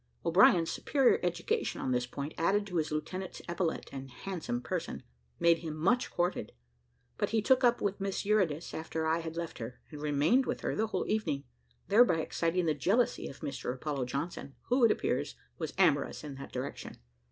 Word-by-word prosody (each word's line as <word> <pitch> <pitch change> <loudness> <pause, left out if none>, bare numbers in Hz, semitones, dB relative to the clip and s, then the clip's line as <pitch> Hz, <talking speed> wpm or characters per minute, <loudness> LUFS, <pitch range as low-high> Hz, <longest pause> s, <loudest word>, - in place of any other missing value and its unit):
O'Brien's 170 -1 +5
superior 280 - +3
education 450 0 -1
on 130 - -1
this 125 0 +1
point, 140 +4 -5
added 200 +5 +2
to 180 -4 -3
his 155 -1 0
lieutenant's 185 +5 -4
epaulet 170 -1 -1
and 135 -1 -6
handsome 160 -3 -4
person, - - -4 0.4
made 170 -1 +5
him 160 -2 -5
much 195 +11 +2
courted: 175 - -1 0.7
but - - +1
he 225 - +2
took 260 +4 +3
up 240 -1 +4
with 200 0 -1
Miss 195 0 -2
Eurydice 185 -7 +1
after 160 0 -3
I 160 +1 +2
had 165 0 -6
left 170 -1 -4
her, 120 +2 -6
and 150 -1 -8
remained 150 - +3
with - - -2
her - - -1
the 220 - +1
whole - - -2
evening; 210 -10 0 0.4
thereby 205 -6 +5
exciting 170 +2 0
the 155 - +3
jealousy 195 - +1
of 135 - -10
Mr 140 - -3
Apollo 140 -1 -2
Johnson, 140 +1 -4
who, 250 +1 +3
it 230 - +8
appears, - - -1 0.2
was 160 -3 -3
amorous 155 -8 +2
in 150 -2 -6
that 135 0 -9
direction. 130 +2 -5
165 Hz, 185 wpm, -31 LUFS, 145-200 Hz, 0.7 s, it